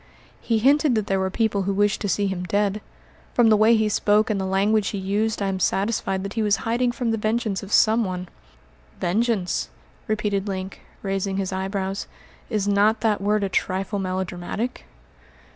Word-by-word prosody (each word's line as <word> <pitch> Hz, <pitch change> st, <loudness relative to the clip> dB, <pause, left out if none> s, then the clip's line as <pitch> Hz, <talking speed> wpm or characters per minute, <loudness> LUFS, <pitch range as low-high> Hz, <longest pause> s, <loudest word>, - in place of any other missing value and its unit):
"He 230 Hz, -, 0 dB
hinted 280 Hz, +3 st, +3 dB
that 215 Hz, -2 st, 0 dB
there 195 Hz, -1 st, 0 dB
were 190 Hz, 0 st, 0 dB
people 210 Hz, 0 st, 0 dB
who 195 Hz, +1 st, -1 dB
wished 205 Hz, +1 st, +1 dB
to 205 Hz, -, -1 dB
see 200 Hz, +3 st, +1 dB
him 190 Hz, -2 st, -2 dB
dead. 205 Hz, +2 st, 0 dB, 0.5 s
From 235 Hz, -2 st, +5 dB
the 215 Hz, -, +6 dB
way 220 Hz, +2 st, +5 dB
he 220 Hz, -1 st, +2 dB
spoke 210 Hz, +1 st, +2 dB
and 200 Hz, -2 st, -1 dB
the -, -, -2 dB
language 200 Hz, +2 st, +2 dB
he 205 Hz, -, -3 dB
used 205 Hz, +2 st, -1 dB
I -, -, 0 dB
am 190 Hz, -1 st, -2 dB
satisfied 195 Hz, 0 st, 0 dB
that 200 Hz, 0 st, -5 dB
he 225 Hz, -, -1 dB
was 210 Hz, -1 st, +3 dB
hiding 240 Hz, +2 st, +1 dB
from 240 Hz, -1 st, -2 dB
the 225 Hz, -, -1 dB
vengeance 215 Hz, -2 st, -1 dB
of 200 Hz, -, -9 dB
some 225 Hz, +3 st, +4 dB
one." 185 Hz, -2 st, -4 dB, 0.7 s
"Vengeance!" 200 Hz, +1 st, 0 dB, 0.4 s
repeated 210 Hz, -2 st, -1 dB
Link, 190 Hz, -1 st, -5 dB, 0.2 s
raising 195 Hz, 0 st, -1 dB
his 190 Hz, -1 st, -2 dB
eyebrows. 190 Hz, +1 st, -3 dB, 0.4 s
"Is 210 Hz, -4 st, -1 dB
not 205 Hz, +2 st, +3 dB
that 215 Hz, -3 st, +1 dB
word 210 Hz, +1 st, +1 dB
a -, -, +1 dB
trifle 190 Hz, +2 st, -1 dB
melodramatic?" 185 Hz, +5 st, -3 dB
205 Hz, 185 wpm, -23 LUFS, 195-220 Hz, 0.7 s, the